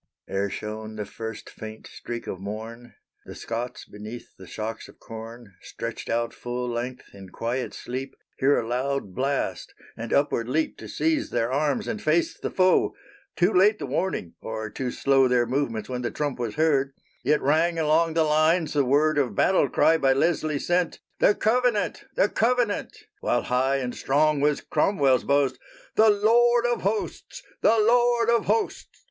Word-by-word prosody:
Ere 100 +1 -1
shone 110 +1 -6
the 105 -1 -4
first 110 +2 -7
faint 110 0 -9
streak 120 -1 -7
of 95 - -5
morn, 110 +4 -7 0.3
The - - -8
Scots 120 +2 -5
beneath 105 +3 -10
the 95 - -13
shocks 110 +1 -5
of - - -17
corn, 115 -1 -10
Stretched - - -6
out 115 0 0
full 125 0 -4
length 120 +1 -5
in 95 -1 -11
quiet 120 +6 -3
sleep, 130 +2 -6 0.2
Hear 140 +2 +4
a 115 - -4
loud 130 -3 -2
blast, 135 +4 -2 0.2
and 115 0 -6
upward 125 -4 +1
leap 155 +4 0
To - - -8
seize 320 -1 0
their 115 +2 -1
arms 150 - 0
and 215 -2 -3
face 160 +2 +1
the - - -4
foe. 185 -1 +3 0.4
Too 180 +4 +2
late 205 +4 +5
the - - -5
warning! 180 - -2
or, 110 -1 -5
too 130 +2 -3
slow 135 +1 +3
Their 125 -1 +3
movements 120 -4 -2
when 125 -1 -4
the 120 - -1
trump 145 -4 -3
was 115 -3 -3
heard, 140 -3 +2 0.3
Yet 150 0 +3
rang 160 +5 +2
along 160 +1 +2
the 165 - +4
lines 155 +1 +2
the 145 -2 +3
word 145 +3 +3
Of 130 -4 0
battle 190 - +3
cry 160 0 +3
by 135 -2 +4
Leslie 155 +1 +1
sent, 175 +3 0 0.2
"The 205 - +4
Covenant! 220 -4 +1
The - - +4
Covenant!" 235 -1 0 0.2
While - - 0
high 130 +2 +1
and 125 -3 -2
strong 150 +2 +2
was 150 0 +2
Cromwell's 140 -10 +2
boast, 140 -3 +2 0.4
"_The 210 -2 +4
Lord 240 +2 +4
of 240 0 0
Hosts! 220 - -3 0.2
The 225 - +4
Lord 240 +1 +3
of 235 - +2
Hosts! 445 - -1
140 Hz, 170 wpm, -25 LUFS, 120-175 Hz, 0.4 s, late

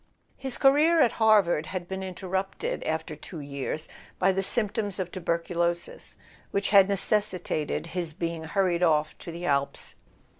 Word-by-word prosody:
His 265 -2 -3
career 300 +5 +5
at 245 -7 +5
Harvard 205 -8 +3
had 180 -2 -5
been 190 +1 -4
interrupted, 190 +1 -3
after 160 -1 -2
two 155 +2 -9
years, 140 +2 -4 0.3
by 190 +1 +3
the 190 +1 0
symptoms 205 -1 0
of 180 -2 -3
tuberculosis 170 -1 -2 0.3
which 200 0 0
had 200 -1 +7
necessitated 190 -7 0
his 170 -1 -3
being 165 0 -4
hurried 180 0 +1
off 155 -3 +2
to 170 - -8
the 170 +1 -6
Engadine. 140 -3 -1
180 Hz, 145 wpm, -27 LUFS, 165-200 Hz, 0.3 s, had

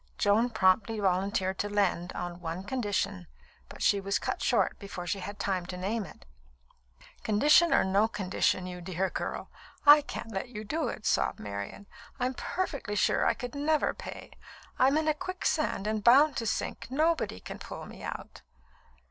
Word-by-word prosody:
Joan 215 +4 +3
promptly 215 0 +2
volunteered 190 0 0
to 205 - -1
lend, 190 -4 0
on 175 0 -5
one 170 +2 -4
condition, 205 - -2 0.4
but - - -7
she 200 - +3
was 195 +1 0
cut - - -3
short 220 -7 +1
before 195 -3 -7
she 185 +3 -2
had 200 +2 -6
time 185 -3 -2
to 180 - -6
name 205 +4 -2
it. 160 - -14 1.0
"Condition 295 +10 +5
or - - +5
no 195 +3 +3
condition, 190 -3 0
you 180 -1 -7
dear 185 +1 -2
girl, - - -4 0.3
I 295 +1 +10
can't 230 -5 -7
let 195 +5 -4
you 215 -3 -7
do 310 +9 -2
it," 215 - -6
sobbed - - +1
Marian. 100 - -6 0.3
"I'm 250 +1 0
perfectly 280 - -3
sure 200 - +2
I - - +2
could 245 -2 -6
never 295 +1 +1
pay. - - -9 0.5
I'm 270 +3 +5
in 315 0 0
a 310 - +4
quicksand 310 - -1
and 215 -1 -1
bound 275 +5 +6
to 230 - -2
sink. - - -3
Nobody 310 - +1
can - - -8
pull - - -8
me - - -11
out." - - -7
205 Hz, 175 wpm, -29 LUFS, 185-255 Hz, 1.0 s, I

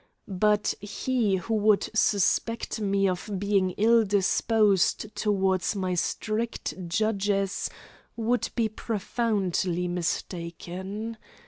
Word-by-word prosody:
But 210 +2 +2
he 215 0 0
who 190 +5 -3
would 215 -1 +3
suspect 220 +3 +1
me 195 -1 +2
of 185 +3 -3
being 195 -1 +2
ill 230 +2 +5
disposed 205 0 +2
toward 190 -3 +1
my 185 -2 -1
strict 215 +6 -2
judges 200 0 0 0.5
would 235 +2 0
be 230 -2 +2
profoundly 200 -5 -1
mistaken. 180 +5 -4
205 Hz, 95 wpm, -27 LUFS, 190-220 Hz, 0.5 s, ill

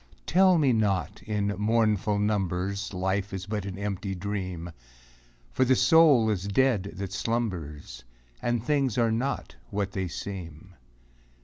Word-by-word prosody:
Tell 185 +1 +5
me 140 -5 +3
not, 105 -4 0
in 105 -1 -1
mournful 105 -2 +2
numbers, 100 -1 -1
Life 95 +2 -2
is 95 0 -5
but 105 -1 -3
an 95 -1 -6
empty 100 -1 -3
dream! 90 -3 -4 0.8
For 130 - +2
the 130 0 +4
soul 130 -4 +5
is 100 -1 -2
dead 100 -2 +1
that 100 -1 -5
slumbers. 95 - -3 0.4
And 120 -2 0
things 140 -4 +1
are 115 -2 +3
not 125 +5 -2
what 100 -1 -2
they 95 -2 -2
seem. 90 -1 -7
100 Hz, 135 wpm, -27 LUFS, 95-115 Hz, 0.8 s, Tell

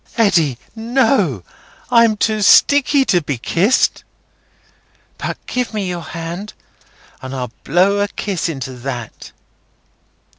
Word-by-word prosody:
"Eddy, 165 - +2 0.2
no! 225 - +1 0.5
I'm 230 -2 +4
too 215 0 0
sticky 285 +6 +5
to 185 -6 +2
be 145 -4 -3
kissed. 190 - +1 1.2
But - - -4
give 250 -3 -3
me 200 -3 -2
your 175 -1 -4
hand, 170 +5 -7 0.7
and 130 +1 -7
I'll 125 -3 -4
blow 195 +4 +2
a 205 - +1
kiss 195 -4 -3
into 135 -4 -5
that." 120 -3 -7
190 Hz, 115 wpm, -18 LUFS, 145-220 Hz, 1.2 s, sticky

